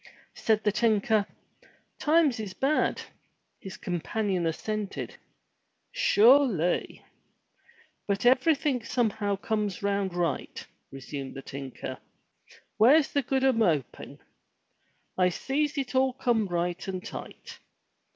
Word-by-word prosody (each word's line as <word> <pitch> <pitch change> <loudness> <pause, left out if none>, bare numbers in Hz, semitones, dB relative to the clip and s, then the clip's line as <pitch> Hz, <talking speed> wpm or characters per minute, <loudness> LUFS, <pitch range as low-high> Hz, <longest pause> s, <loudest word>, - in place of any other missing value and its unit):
Said 220 -1 0
the 210 - +2
tinker, 215 -1 +2 0.7
"Times 300 -5 +3
is 205 -4 -6
bad!" 285 +3 +1 0.6
His 190 - -9
companion 185 0 -2
assented, 210 +5 -4 0.8
"Sure 280 - +5
ly!" 180 -6 -2 1.0
"But 200 +2 -1
everything 265 0 +3
somehow 215 -4 0
comes 205 -1 -3
round 200 -2 -1
right," 170 -6 -2 0.3
resumed 135 0 -7
the 135 - -8
tinker. 135 -2 -7 0.8
"Where's 270 +8 +5
the 285 - +1
good 265 +1 -1
o' 265 - +5
moping? 175 - -1 1.0
I 180 0 +4
sees 290 - -2
it 270 -2 -3
all 260 0 +2
come 240 -5 0
right 175 0 -2
and 185 -1 -5
tight. - - -9
215 Hz, 110 wpm, -27 LUFS, 185-260 Hz, 1.0 s, Sure